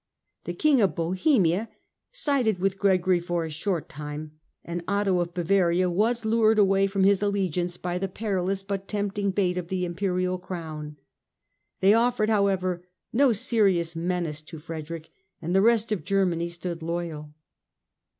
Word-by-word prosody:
The - - -4
King 295 -5 +3
of 195 - +2
Bohemia 185 - +1 0.4
sided 280 - +1
with 195 +1 -1
Gregory 185 -2 +3
for 175 -1 -2
a 160 - -6
short 165 +2 -2
time, 150 +1 -7 0.3
and 170 0 -4
Otho 200 -2 +1
of 175 0 -3
Bavaria 180 0 +2
was 225 +5 +1
lured 220 0 +3
away 195 -1 +4
from 195 0 0
his 195 0 +4
allegiance 180 -4 -1
by 180 0 -3
the 195 - -1
perilous 195 -1 -2
but 195 0 -4
tempting 205 -1 -1
bait 185 -2 0
of 175 - -6
the 180 0 -1
Imperial 180 0 -1
Crown. 160 -5 -7 0.8
They 195 +2 +6
offered, 230 -1 +2
however, 190 -4 +1 0.3
no 270 +2 +4
serious 195 -6 +1
menace 165 -3 -2
to 155 +1 -10
Frederick 160 0 -7 0.3
and 170 +3 -3
the 195 - +5
rest 225 0 +3
of 210 - -1
Germany 180 -4 +1
stood 170 -1 -6
loyal. 160 -3 -4
185 Hz, 150 wpm, -26 LUFS, 170-200 Hz, 0.8 s, They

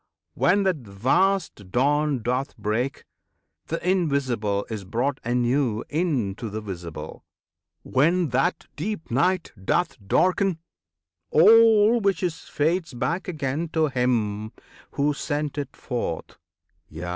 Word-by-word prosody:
When 200 +3 +3
that 190 -3 +1
vast 130 - 0
Dawn 145 +1 +1
doth 125 +4 -2
break, 110 +5 -2 0.6
th' - - -7
Invisible 140 - 0
Is 110 -3 -5
brought 120 +8 -1
anew 120 -1 +1
into 130 - -1
the 105 +2 -4
Visible; 85 -7 -7 0.6
When 165 +5 +2
that 130 +3 0
deep 175 - -4
Night 180 +8 +1
doth 175 - 0
darken, 185 - +2 0.7
all 225 +5 +6
which 195 -2 +1
is 175 -1 -1
Fades 160 -1 0
back 165 +9 -2
again 155 -1 -2
to 160 -2 +2
Him 110 -5 0 0.4
Who 145 +1 +1
sent 145 0 -3
it 140 -2 -5
forth; 115 -10 -4 0.5
Yea! 85 +3 -6
140 Hz, 115 wpm, -24 LUFS, 115-175 Hz, 0.7 s, all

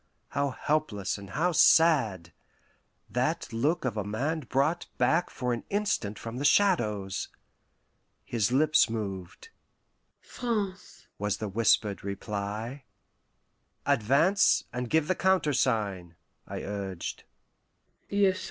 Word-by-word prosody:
how 140 +1 0
helpless 125 -9 -1
and 100 -1 -10
how 170 - +1
sad: 130 - +4 0.7
that - - -1
look 150 +7 0
of 115 -4 -2
a 105 - -1
man 130 +11 -2
brought 150 +5 0
back 175 +2 +2
for 125 -1 -2
an 120 - -4
instant 200 - -1
from 115 +1 -7
the 140 - -3
Shadows! 105 - +2 1.0
his 115 -1 0
lips 155 +1 +4
moved. 100 - -5 0.7
"France," 210 -6 -4
was 105 0 -1
the 110 - -4
whispered 105 0 +2
reply. 105 +6 -4 1.0
"Advance 140 - +3
and 125 0 -3
give 160 -1 +2
the 185 - +2
countersign!" 115 - +1 0.3
I - - -5
urged. 100 -3 -5
120 Hz, 105 wpm, -28 LUFS, 105-155 Hz, 1.0 s, sad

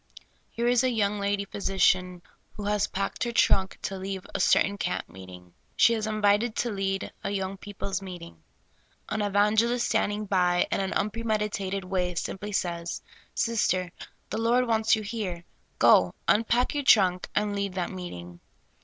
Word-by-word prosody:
Here 235 - -3
is 245 0 +3
a 255 - +3
young 210 -3 0
lady 200 0 -1
phj^si 195 -1 -4
cian 180 -1 +2 0.3
who 210 - -8
has 210 0 +1
packed 195 +5 -3
her 240 - -1
trunk 195 -4 +2
to 195 -1 -4
leave 190 0 -5
a - - -2
certain 200 0 +3
camp - - -2
meeting. 90 0 -13 0.2
She 230 - +5
is 220 -1 -2
invited 215 +1 +2
to 240 - -1
lead 195 -1 -2
a - - -2
3'Oung 195 -1 -3
people's 200 -1 -5
meeting. 175 - -9 0.7
An 215 - -1
evangelist 210 +4 +2
standing 210 +1 0
by, 180 -3 +2
in - - +1
an 195 -1 -1
unpremedita 210 -2 -1
ted 195 -1 -2
way, 180 -1 -1
simply 195 +4 -4
says: 170 -3 -3
' - - -23
' - - -41
Sister, 185 -6 0 0.4
the 215 - -2
Lord 240 +2 +3
wants 225 -1 +3
you 215 - -5
here; 200 -6 -4 0.3
go, - - +5
unpack 235 +3 +2
your 290 -1 -1
trunk, 185 -8 +4
and 210 -1 0
lead 200 -2 -2
that 180 -2 -2
meeting. 90 - -8
200 Hz, 170 wpm, -27 LUFS, 185-215 Hz, 0.7 s, She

